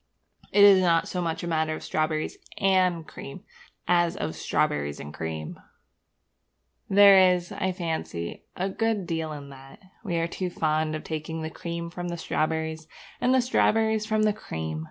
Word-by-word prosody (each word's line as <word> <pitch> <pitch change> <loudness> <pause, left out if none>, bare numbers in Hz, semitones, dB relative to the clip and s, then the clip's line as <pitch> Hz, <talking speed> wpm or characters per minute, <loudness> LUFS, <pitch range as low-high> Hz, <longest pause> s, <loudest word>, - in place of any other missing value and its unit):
It 205 - +6
is 195 -2 +8
not 165 -2 +3
so 180 - -3
much 165 -1 -2
a - - -3
matter 160 -1 0
of - - -9
strawberries 155 0 -1 0.2
and 185 -4 +2
cream 140 +6 -9 0.4
as 175 -1 +2
of - - -2
strawberriesandcream. 75 +1 -2 1.3
There 195 -2 +7
is, 175 -1 -6
I 190 - -1
fancy, 160 - -4
a 185 - -1
good 215 0 -1
deal 160 -2 -3
in 145 -2 -8
that. 135 0 -13 0.3
We 185 -6 -2
are 165 - +1
too 180 +2 -3
fond 155 -2 0
of 155 - -6
taking 160 +1 -4
the 160 - -4
cream 170 0 -5
from 175 0 -5
the 170 0 -4
strawberries, 160 0 -2 0.3
and 250 - +3
the 260 0 +4
strawberries 220 -3 +2
from 215 -1 +1
the 210 -1 +3
cream. 80 - -5
170 Hz, 160 wpm, -26 LUFS, 155-190 Hz, 1.3 s, is